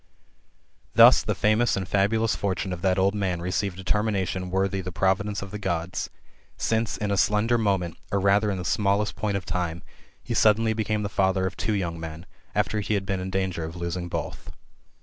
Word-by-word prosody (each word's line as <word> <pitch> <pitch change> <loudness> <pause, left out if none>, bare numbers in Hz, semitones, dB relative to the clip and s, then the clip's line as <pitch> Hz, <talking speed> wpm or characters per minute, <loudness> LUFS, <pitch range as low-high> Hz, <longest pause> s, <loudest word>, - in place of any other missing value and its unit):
Thus - - +8
the - - -2
famous 110 +2 +2
and 95 -2 -3
fabulous^ 105 +4 +2
fortune 95 -1 -2
of 85 - -6
that 95 0 +2
old 95 +1 +3
man 95 -4 -1
received 90 +2 -2
a 95 - -7
termination 95 -3 0
worthy 95 +1 0
the 90 0 -6
providence 95 +3 0
of 100 - -9
the 105 - -5
Gods; 85 -2 -2 0.5
since 110 -1 0
in 105 -1 -2
a 100 - +1
slender 105 +4 +3
moment, 95 -6 0
or 100 - +2
rather 100 +2 +3
in 100 - -1
the 90 - -5
smallest 105 -1 +1
point 100 +1 -1
of 95 - -6
time, 85 -2 -2 0.4
he - - -4
suddenly 110 +1 +4
became 110 -1 -1
the - - -1
father 95 -1 +1
of 95 - -3
two 110 - -1
young 85 -5 -2
men, 80 +1 -7 0.3
after 110 - +1
he 105 +1 -1
had 100 -1 -2
been 95 -1 -1
in 95 +1 -4
danger 95 -3 -1
of 80 +2 -6
losing 85 0 -4
both. - - -5
95 Hz, 200 wpm, -25 LUFS, 90-105 Hz, 0.5 s, Thus